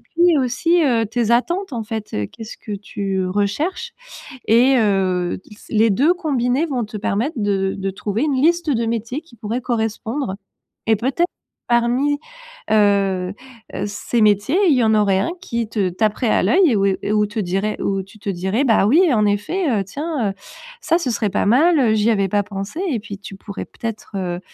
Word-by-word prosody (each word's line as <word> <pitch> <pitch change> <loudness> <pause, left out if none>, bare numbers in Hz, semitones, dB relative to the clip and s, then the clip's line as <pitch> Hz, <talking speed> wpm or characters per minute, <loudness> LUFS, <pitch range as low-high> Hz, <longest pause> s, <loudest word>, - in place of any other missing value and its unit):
puis 340 -1 +2
aussi 275 +7 +2
heu, 230 -5 +2
tes 235 +1 -1
attentes 340 +8 +1
en 230 -2 -3
fait, 220 -1 -5
heu, 105 -1 -1
qu'est-ce 225 - -10
que 210 - -8
tu 195 -2 -3
recherches? 285 - -1 0.5
Et 250 +4 +5
heu, 190 -4 +1
s 210 - -15
les 220 +1 +4
2 280 - +3
combinés 280 -3 0
vont 250 -6 -2
te 210 +1 -8
permettre 220 +9 -1
de 195 -2 0
de 195 0 -2
trouver 205 +5 -3
une 290 -3 0
liste 340 0 +2
de 235 -4 +1
métiers 230 +4 -2
qui 250 -8 -19
pourraient 220 +3 -3
correspondre. 225 0 -2 0.5
Et, 220 -1 +4
peut-ê 265 - 0 0.4
parmi, 245 +5 +2 0.5
heu 200 -3 +2 0.4
heu, 200 - -2
ces 210 +3 -2
métiers, 210 - +3
il 290 - +5
y 250 - +3
en 220 - +3
aurait 200 -3 +3
1 205 - -1
qui 235 - -3
te 200 -5 0
taperait 215 +4 0
à - - +3
l'oeil 285 - +4
et - - +2
où 200 0 +2
et 195 - +1
et 210 - -1
où 210 0 +3
te 210 +2 -7
dirait 195 +3 -2
où 195 -1 -1
tu 205 +3 -17
te 200 - -4
dirais: 190 +8 -1
«Bah 225 -5 +4
oui 320 - +4
en 210 -2 +3
effet, 240 - 0
heu, 205 -5 +1
tiens, 280 - -2
heu, - - -6 0.5
ça 335 - +2
ce 265 -8 -2
serait 215 -2 -1
pas 200 - 0
mal, 305 +9 +4
heu, 225 -4 +3
j'y 215 +2 +2
avais 200 -3 +1
pas 205 +2 +1
pensé», 200 - -6
et 240 - 0
puis 200 -1 -8
tu 195 -1 -10
pourrais 200 0 -7
peut-être, 225 -2 -7
heu, 180 -2 -3
220 Hz, 200 wpm, -20 LUFS, 200-260 Hz, 0.5 s, Et